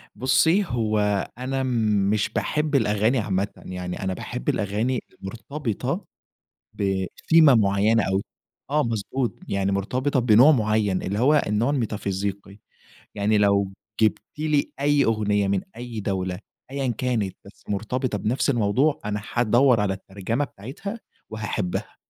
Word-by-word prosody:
بُصي، 145 Hz, +10 st, +3 dB
هو 110 Hz, -6 st, 0 dB, 0.4 s
أنا 130 Hz, +1 st, -2 dB, 0.5 s
مش 105 Hz, -1 st, +1 dB
باحب 150 Hz, -1 st, -1 dB
الأغاني 110 Hz, +1 st, +2 dB
عامةً، 100 Hz, -2 st, 0 dB, 0.2 s
يعني 90 Hz, +1 st, -5 dB
أنا 95 Hz, 0 st, -1 dB
باحب 60 Hz, -, -4 dB
الأغاني 110 Hz, +5 st, -1 dB, 0.2 s
المرتبطة 115 Hz, +4 st, -4 dB, 0.7 s
بثيمة 100 Hz, -, +3 dB
معيّنة 105 Hz, +1 st, +3 dB
أو 95 Hz, +1 st, 0 dB, 0.5 s
آه، 150 Hz, +1 st, +2 dB
مضبوط، 115 Hz, +2 st, -2 dB
يعني 100 Hz, 0 st, 0 dB
مرتبطة 130 Hz, +8 st, 0 dB
بنوع 125 Hz, +5 st, +6 dB
معيّن 105 Hz, -6 st, +1 dB
اللي 100 Hz, +2 st, -2 dB
هو 145 Hz, +5 st, +4 dB
النوع 105 Hz, +5 st, +1 dB
الميتافيزيقي، 100 Hz, -5 st, -3 dB, 0.6 s
يعني 105 Hz, +1 st, +2 dB
لو 100 Hz, -1 st, +2 dB, 0.3 s
جبتِ 110 Hz, -1 st, +2 dB, 0.2 s
لي 150 Hz, -2 st, 0 dB
أي 145 Hz, 0 st, +3 dB
أغنية 105 Hz, -2 st, +1 dB
من 100 Hz, -1 st, +1 dB, 0.2 s
أي 120 Hz, -2 st, -6 dB
دولة 95 Hz, -2 st, -2 dB, 0.3 s
أيًا 135 Hz, -2 st, -2 dB
كانت 115 Hz, -7 st, -1 dB
بس 100 Hz, -, -16 dB
مرتبطة 110 Hz, +2 st, -2 dB
بنفس 120 Hz, +7 st, 0 dB
الموضوع، 125 Hz, +5 st, +2 dB
أنا 105 Hz, 0 st, -3 dB
هادوّر 120 Hz, +1 st, +4 dB
على 100 Hz, -2 st, +1 dB
الترجمة 100 Hz, +7 st, -3 dB
بتاعتها 145 Hz, -, -8 dB, 0.3 s
وهاحبها. 105 Hz, -4 st, -3 dB
110 Hz, 125 wpm, -24 LUFS, 100-130 Hz, 0.7 s, بنوع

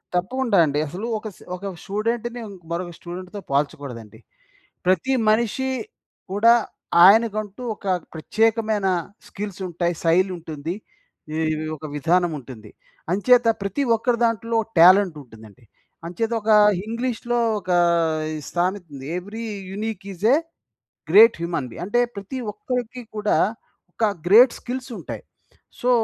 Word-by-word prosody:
తప్పకుండ 235 Hz, +7 st, -1 dB
అండి. 145 Hz, -1 st, -1 dB
అసలు 190 Hz, +10 st, -5 dB
ఒక 215 Hz, -, -7 dB
స -, -, -20 dB, 0.2 s
ఒక 185 Hz, -, -12 dB, 0.2 s
స్టూడెంట్‌ని 230 Hz, +4 st, -2 dB, 0.3 s
మరొక 175 Hz, +1 st, -3 dB
స్టూడెంట్‌తో 185 Hz, +3 st, -8 dB
పోల్చకూడదండి. 140 Hz, -6 st, -3 dB, 0.7 s
ప్రతి 190 Hz, +9 st, +2 dB, 0.2 s
మనిషి 235 Hz, +4 st, +1 dB, 0.6 s
కూడా 225 Hz, +4 st, +5 dB, 0.5 s
ఆయనకంటూ, 215 Hz, +1 st, +3 dB
ఒక 200 Hz, -, -10 dB, 0.3 s
ప్రత్యేకమైన 215 Hz, +4 st, +1 dB, 0.4 s
స్కిల్స్ 200 Hz, -2 st, -6 dB
ఉంటాయి. 175 Hz, +1 st, -1 dB
శైలి 180 Hz, +3 st, +3 dB
ఉంటుంది. 160 Hz, 0 st, -5 dB, 0.6 s
ఈ -, -, -1 dB, 0.4 s
ఒక 155 Hz, -, -10 dB
విధానం 170 Hz, +3 st, +2 dB
ఉంటుంది. 115 Hz, -5 st, -11 dB, 0.4 s
అంచేత 240 Hz, +5 st, +4 dB
ప్రతి 200 Hz, +8 st, -1 dB
ఒక్కరి 235 Hz, +1 st, 0 dB
దాంట్లో 230 Hz, 0 st, 0 dB, 0.2 s
టాలెంట్ 185 Hz, -1 st, +6 dB
ఉంటుందండి. 110 Hz, 0 st, -16 dB, 0.4 s
అంచేత 220 Hz, +7 st, -2 dB
ఒక 220 Hz, +1 st, +1 dB, 0.3 s
ఇంగ్లీష్‌లో 240 Hz, +1 st, -2 dB, 0.2 s
ఒక 185 Hz, -1 st, -5 dB, 0.6 s
ఈ -, -, -4 dB, 0.2 s
సామెత 180 Hz, +1 st, 0 dB
ఉంది. 135 Hz, -1 st, -8 dB
Every 215 Hz, +5 st, -6 dB, 0.3 s
unique 210 Hz, -1 st, -4 dB
is 190 Hz, +3 st, -5 dB
a -, -, +7 dB, 0.7 s
great 220 Hz, +4 st, +7 dB
human 170 Hz, -6 st, -2 dB
be -, -, -11 dB
అంటే 240 Hz, +6 st, +1 dB, 0.2 s
ప్రతి 200 Hz, +6 st, -6 dB
ఒక్కరికి 245 Hz, +3 st, -4 dB
కూడా 210 Hz, 0 st, +1 dB, 0.5 s
ఒక -, -, -5 dB, 0.2 s
గ్రేట్ 235 Hz, +6 st, +7 dB
స్కిల్స్ 255 Hz, +1 st, -6 dB
ఉంటాయి. -, -, -7 dB, 0.6 s
సో, 245 Hz, -, +1 dB
200 Hz, 120 wpm, -23 LUFS, 175-230 Hz, 0.7 s, a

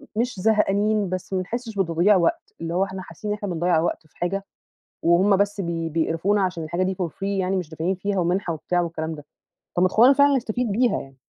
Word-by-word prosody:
مش 235 Hz, -1 st, -1 dB
زهقانين 210 Hz, 0 st, +2 dB
بس 185 Hz, +1 st, -5 dB
ما 185 Hz, -, +1 dB
نحسّش 230 Hz, +4 st, -5 dB
بتضييع 185 Hz, +1 st, +3 dB
وقت، 170 Hz, -3 st, 0 dB
اللي 165 Hz, 0 st, -3 dB
هو 185 Hz, +2 st, +2 dB
احنا 190 Hz, -1 st, -5 dB
حاسين 185 Hz, +4 st, -6 dB
إن -, -, 0 dB
إحنا 205 Hz, -, -5 dB
بنضيّع 175 Hz, -1 st, +1 dB
وقت 160 Hz, -1 st, -2 dB
في -, -, -30 dB
حاجة، 195 Hz, +3 st, -2 dB, 0.6 s
وهُم 185 Hz, +4 st, +4 dB
بس 200 Hz, 0 st, 0 dB
بي 165 Hz, -2 st, -3 dB
بيقرفونا 165 Hz, +5 st, +1 dB
عشان 180 Hz, -3 st, -2 dB
الحاجة 170 Hz, +4 st, -1 dB
دي 190 Hz, +1 st, -1 dB
for 180 Hz, -1 st, -2 dB
free -, -, -30 dB
يعني 195 Hz, -1 st, 0 dB
مش 180 Hz, -4 st, -4 dB
دافعين 165 Hz, +4 st, -2 dB
فيها 200 Hz, +1 st, -2 dB
ومنحة 175 Hz, 0 st, 0 dB
وبتاع 175 Hz, +3 st, -1 dB
والكلام 160 Hz, -1 st, -3 dB
ده. 150 Hz, -1 st, -12 dB, 0.5 s
طب 175 Hz, -, +3 dB
ما 185 Hz, -, +5 dB
تخلّونا 240 Hz, +8 st, +6 dB
فعلًا 280 Hz, 0 st, +4 dB
نستفيد 240 Hz, -2 st, -1 dB
بيها 240 Hz, +4 st, +2 dB
يعني، 135 Hz, -1 st, -12 dB
185 Hz, 220 wpm, -23 LUFS, 170-205 Hz, 0.6 s, تخلّونا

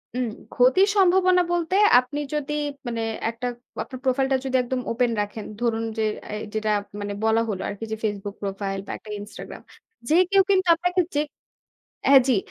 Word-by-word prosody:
হুম। 250 Hz, -2 st, 0 dB, 0.3 s
ক্ষতির 265 Hz, +11 st, +5 dB
সম্ভাবনা 370 Hz, -1 st, +5 dB
বলতে 345 Hz, +1 st, 0 dB, 0.2 s
আপনি 255 Hz, +4 st, -4 dB
যদি 295 Hz, 0 st, -2 dB, 0.3 s
মানে 230 Hz, -1 st, -2 dB, 0.3 s
একটা 235 Hz, +2 st, -4 dB, 0.4 s
আপনার 255 Hz, -2 st, -9 dB
profile 265 Hz, +1 st, +1 dB
টা 265 Hz, -, +4 dB
যদি 260 Hz, 0 st, -1 dB
একদম 250 Hz, +1 st, -2 dB
open 240 Hz, 0 st, +1 dB
রাখেন, 205 Hz, +1 st, -5 dB, 0.2 s
ধরুন 225 Hz, -1 st, 0 dB
যে, 220 Hz, -, +1 dB, 0.3 s
এই 210 Hz, -, -5 dB
যেটা 215 Hz, 0 st, 0 dB, 0.3 s
মানে 205 Hz, 0 st, -4 dB
বলা 225 Hz, +1 st, +3 dB
হলো 190 Hz, -3 st, -3 dB
আরকি 205 Hz, +2 st, -6 dB
যে -, -, 0 dB
Facebook 205 Hz, -1 st, -3 dB
profile 195 Hz, 0 st, -3 dB
বা -, -, -4 dB
একটা 215 Hz, -, -15 dB
Instagram। 205 Hz, -, -9 dB, 0.5 s
যে 315 Hz, -, +4 dB
কেউ 390 Hz, -1 st, +5 dB
কিন্তু 375 Hz, -2 st, +3 dB
আপনাকে 355 Hz, +2 st, +1 dB
যে 295 Hz, -, +3 dB, 0.9 s
হ্যাঁ, 275 Hz, -1 st, +9 dB
জি। 250 Hz, -, +4 dB
250 Hz, 175 wpm, -24 LUFS, 215-310 Hz, 0.9 s, হ্যাঁ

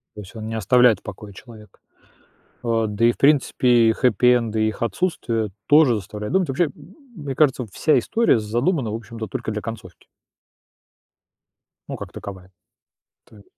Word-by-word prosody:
То 105 Hz, -, -8 dB
есть 100 Hz, +4 st, -14 dB
он 110 Hz, 0 st, -6 dB
не 115 Hz, -, -4 dB
оставляет 120 Hz, +2 st, +4 dB
в -, -, -37 dB
покое 100 Hz, 0 st, -9 dB
человека. 110 Hz, 0 st, -15 dB, 0.8 s
А, 115 Hz, -2 st, 0 dB
да 105 Hz, +3 st, 0 dB
и, 120 Hz, -, +5 dB
в -, -, -12 dB
принципе, 125 Hz, -5 st, +3 dB
и -, -, +3 dB
хеппи-энды, 115 Hz, -2 st, +2 dB
и 110 Hz, -, +2 dB
их 110 Hz, -, -9 dB
отсутствие 115 Hz, -, -2 dB, 0.2 s
тоже 145 Hz, -5 st, +5 dB
заставляют 105 Hz, -, -6 dB
думать. 185 Hz, -6 st, +1 dB
Вообще, 145 Hz, +4 st, +1 dB, 0.5 s
мне 145 Hz, -6 st, -6 dB
кажется, 135 Hz, -4 st, +2 dB
вся 155 Hz, -, +2 dB
история 230 Hz, -, +2 dB
задумана, 120 Hz, -, -1 dB
в -, -, -3 dB
общем-то, 115 Hz, 0 st, -7 dB
только -, -, -5 dB
для 105 Hz, -1 st, -4 dB
концовки. 110 Hz, -6 st, -9 dB, 1.8 s
Ну, -, -, -5 dB
как -, -, -9 dB
таковая. 95 Hz, -2 st, -10 dB, 0.7 s
То 110 Hz, -, -20 dB
е -, -, -16 dB
115 Hz, 165 wpm, -22 LUFS, 105-130 Hz, 1.8 s, и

